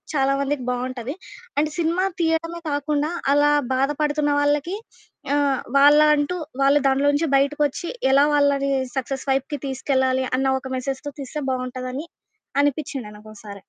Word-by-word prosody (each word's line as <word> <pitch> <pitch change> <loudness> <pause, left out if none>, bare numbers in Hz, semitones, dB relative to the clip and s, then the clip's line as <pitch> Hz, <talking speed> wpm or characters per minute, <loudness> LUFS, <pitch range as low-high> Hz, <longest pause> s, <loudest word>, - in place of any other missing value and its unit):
చాలామందికి 275 -1 0
బావుంటది, 255 +2 -4 0.4
and 305 0 0
cinema 340 +3 +1 0.2
తియ్యడమే 330 +1 -1
కాకుండా, 290 +2 -1 0.2
అలా 290 +1 +4 0.2
బాధపడుతున్న 295 +2 0
వాళ్ళకి 295 +6 0 0.6
ఆహ్, 280 -3 +1 0.2
వాళ్ళ 290 +1 +7 0.2
అంటూ, 290 +4 -1 0.3
వాళ్ళు 275 +2 +5
దాన్లోంచి 285 +4 +2
బయటకొచ్చి, 290 +3 +1 0.2
ఎలా 275 +1 +6
వాళ్ళని 280 -1 +2 0.3
సక్సస్ 265 +1 -3
వైపుకి 270 +2 -1
తీసుకెళ్లాలి 260 -1 0
అన్న 265 0 +1
ఒక 265 - -9
మెసేజ్‌తో 270 +3 -4
తీస్తే 280 +2 -5
బావుంటదని 255 +3 -4 0.5
అనిపిచ్చింది 280 -5 -2
నాకోసారి. 210 -1 -11
280 Hz, 120 wpm, -22 LUFS, 265-295 Hz, 0.6 s, వాళ్ళ